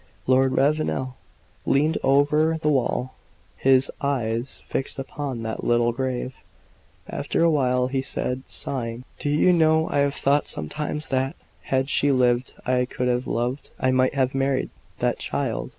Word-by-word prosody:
Lord 130 Hz, 0 st, +3 dB
Ravenel 135 Hz, -2 st, +1 dB, 0.5 s
leaned 150 Hz, +4 st, +2 dB
over 150 Hz, +4 st, +3 dB
the 150 Hz, -, +1 dB
wall, 130 Hz, -1 st, 0 dB, 0.4 s
his 130 Hz, 0 st, +3 dB
eyes 120 Hz, -3 st, -2 dB
fixed 135 Hz, -, -2 dB
upon 135 Hz, -3 st, -5 dB
that 110 Hz, 0 st, -4 dB
little 120 Hz, 0 st, +3 dB
grave. 130 Hz, +1 st, -3 dB, 0.7 s
After -, -, -1 dB
a 170 Hz, -, +5 dB
while, 125 Hz, -4 st, +2 dB
he 130 Hz, +1 st, -1 dB
said, 130 Hz, -1 st, -3 dB
sighing: 120 Hz, -2 st, -4 dB, 0.2 s
"Do 145 Hz, -, -2 dB
you 155 Hz, +5 st, +4 dB
know, 160 Hz, -1 st, +3 dB
I 145 Hz, -, +1 dB
have 140 Hz, 0 st, +1 dB
thought 140 Hz, +2 st, +2 dB
sometimes 150 Hz, -, -4 dB
that, 130 Hz, 0 st, 0 dB, 0.3 s
had 130 Hz, 0 st, +1 dB
she 145 Hz, 0 st, +2 dB
lived, 125 Hz, -1 st, +2 dB
I 125 Hz, 0 st, +2 dB
could 125 Hz, 0 st, -2 dB
have 125 Hz, +1 st, 0 dB
loved 125 Hz, +4 st, -2 dB
I 130 Hz, -, +2 dB
might 130 Hz, +1 st, +2 dB
have 130 Hz, -1 st, +1 dB
married 135 Hz, 0 st, 0 dB, 0.3 s
that -, -, 0 dB
child!" -, -, -2 dB
130 Hz, 150 wpm, -24 LUFS, 125-145 Hz, 0.7 s, a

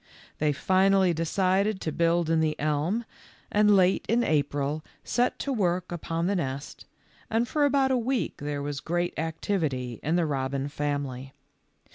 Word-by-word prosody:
They 150 Hz, 0 st, +2 dB
finally 190 Hz, +4 st, +3 dB
decided 190 Hz, +5 st, +1 dB
to 160 Hz, -, -2 dB
build 170 Hz, +1 st, +2 dB
in 165 Hz, -, +3 dB
the 155 Hz, -1 st, 0 dB
elm, 155 Hz, +10 st, 0 dB, 0.5 s
and 210 Hz, 0 st, +5 dB
late 185 Hz, 0 st, +3 dB
in 235 Hz, +2 st, +3 dB
April 145 Hz, -, 0 dB, 0.2 s
set 245 Hz, +1 st, 0 dB
to 280 Hz, -, -2 dB
work 180 Hz, -5 st, 0 dB
upon 165 Hz, 0 st, -2 dB
the 200 Hz, +2 st, +1 dB
nest, 140 Hz, -4 st, -4 dB, 0.4 s
and 230 Hz, +2 st, +1 dB
for 295 Hz, +2 st, +2 dB
about 275 Hz, -2 st, +3 dB
a 260 Hz, -, +3 dB
week 240 Hz, -5 st, -1 dB
there 145 Hz, 0 st, -4 dB
was 145 Hz, -1 st, -3 dB
great 175 Hz, +3 st, -1 dB
activity 155 Hz, -, -2 dB
in 160 Hz, +3 st, 0 dB
the 175 Hz, -2 st, +2 dB
robin 135 Hz, -1 st, -2 dB
family. 140 Hz, -3 st, -3 dB
165 Hz, 155 wpm, -27 LUFS, 145-195 Hz, 0.5 s, and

